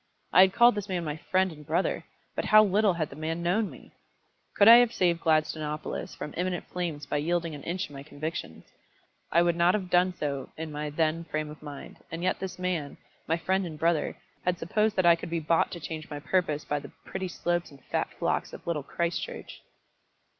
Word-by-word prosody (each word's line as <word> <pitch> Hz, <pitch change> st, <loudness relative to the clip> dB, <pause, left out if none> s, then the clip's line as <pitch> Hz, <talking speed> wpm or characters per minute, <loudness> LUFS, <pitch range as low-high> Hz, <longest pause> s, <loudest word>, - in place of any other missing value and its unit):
I 185 Hz, -, +9 dB
had 190 Hz, 0 st, +6 dB
called 240 Hz, +1 st, +6 dB
this 205 Hz, -1 st, -5 dB
man 180 Hz, -2 st, -1 dB
my 150 Hz, -1 st, -2 dB
friend 185 Hz, 0 st, +3 dB
and 150 Hz, -1 st, -11 dB
brother, 165 Hz, +5 st, 0 dB, 0.3 s
but -, -, -2 dB
how 215 Hz, 0 st, +7 dB
little 205 Hz, 0 st, +3 dB
had 160 Hz, -3 st, -2 dB
the -, -, -9 dB
man 160 Hz, +3 st, -3 dB
known 190 Hz, +4 st, +1 dB
me! -, -, -14 dB, 0.6 s
Could 200 Hz, -, +6 dB
I 230 Hz, +1 st, +12 dB
have 240 Hz, -1 st, +5 dB
saved 175 Hz, -6 st, +2 dB
all -, -, -22 dB
Gladstonopolis 155 Hz, -1 st, -1 dB
from 150 Hz, -, -6 dB
imminent 180 Hz, 0 st, -2 dB
flames 170 Hz, -5 st, -3 dB
by -, -, -1 dB
yielding 165 Hz, +2 st, 0 dB
an 145 Hz, -, -7 dB
inch 180 Hz, +7 st, -3 dB
in -, -, -15 dB
my 140 Hz, -, -7 dB
convictions, 145 Hz, -, -6 dB, 0.7 s
I 170 Hz, -, +5 dB
would 170 Hz, -1 st, +2 dB
not 175 Hz, +2 st, +4 dB
have 185 Hz, -4 st, -3 dB
done 180 Hz, +1 st, +3 dB
so 140 Hz, -4 st, -3 dB
in 160 Hz, 0 st, -5 dB
my 150 Hz, 0 st, -3 dB
then 160 Hz, +2 st, 0 dB
frame 155 Hz, -2 st, -3 dB
of 150 Hz, -, -12 dB
mind; 145 Hz, -2 st, -9 dB
and 165 Hz, +1 st, -5 dB
yet 185 Hz, -, +1 dB
this 190 Hz, -1 st, -5 dB
man, 180 Hz, -6 st, -2 dB, 0.3 s
my 165 Hz, -, +2 dB
friend 190 Hz, +3 st, 0 dB
and 160 Hz, -4 st, -6 dB
brother, 165 Hz, 0 st, +1 dB, 0.3 s
had 180 Hz, 0 st, +1 dB
supposed 210 Hz, +6 st, +1 dB
that 185 Hz, -, +2 dB
I 170 Hz, -1 st, +8 dB
could 165 Hz, -, -7 dB
be 170 Hz, 0 st, -1 dB
bought 160 Hz, +1 st, +2 dB
to 175 Hz, -, -6 dB
change 155 Hz, 0 st, -6 dB
my 145 Hz, -1 st, -5 dB
purpose 155 Hz, -1 st, 0 dB
by 145 Hz, -, -1 dB
the 140 Hz, -1 st, -10 dB, 0.2 s
pretty 190 Hz, -, -4 dB
slopes 175 Hz, 0 st, -1 dB
and 140 Hz, -2 st, -15 dB
fat -, -, 0 dB
flocks -, -, -1 dB
of -, -, -10 dB
Little 170 Hz, -3 st, -1 dB
Christchurch! 170 Hz, -, -4 dB
170 Hz, 220 wpm, -28 LUFS, 155-185 Hz, 0.7 s, I